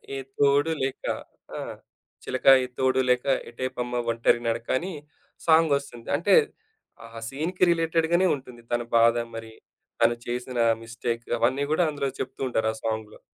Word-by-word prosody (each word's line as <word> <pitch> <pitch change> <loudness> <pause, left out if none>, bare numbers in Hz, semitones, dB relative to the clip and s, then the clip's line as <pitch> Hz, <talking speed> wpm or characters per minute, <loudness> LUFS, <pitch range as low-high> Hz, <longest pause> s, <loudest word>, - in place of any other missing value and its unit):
ఏ - - -3 0.2
తోడు 145 +2 +4
లేక' 135 0 -3 0.5
ఆ! - - -4 0.7
'చిలకా 130 +1 +4
ఏ - - -1
తోడు 130 0 +3
లేక 125 0 +2 0.3
ఎటేపమ్మ 125 0 -4 0.2
ఒంటరి 115 +1 +2
నడకని.' 130 +10 -2 0.5
సాంగొస్తుంది. 140 -7 +2
అంటే 175 +6 +4 0.7
ఆహా! 115 0 -10
సీన్‌కి 160 +8 -2
రిలేటెడ్‌ 165 -1 +1
గానే 185 +2 +4
ఉంటుంది 125 -3 -12
తన 120 0 +1 0.2
బాధ 115 0 +5 0.2
మరి, 115 0 -8 0.5
తను 115 0 +4
చేసిన 125 +1 -3 0.2
మిస్టేక్ 115 +1 -4
అవన్నీ 130 +4 +2
కూడా 175 - +3
అందులో 140 -2 -2
చెప్తూ - - -6
ఉంటారు 110 -2 +1
ఆ - - -10
సాంగ్‌లో. 110 -1 -4
130 Hz, 140 wpm, -26 LUFS, 115-145 Hz, 0.7 s, బాధ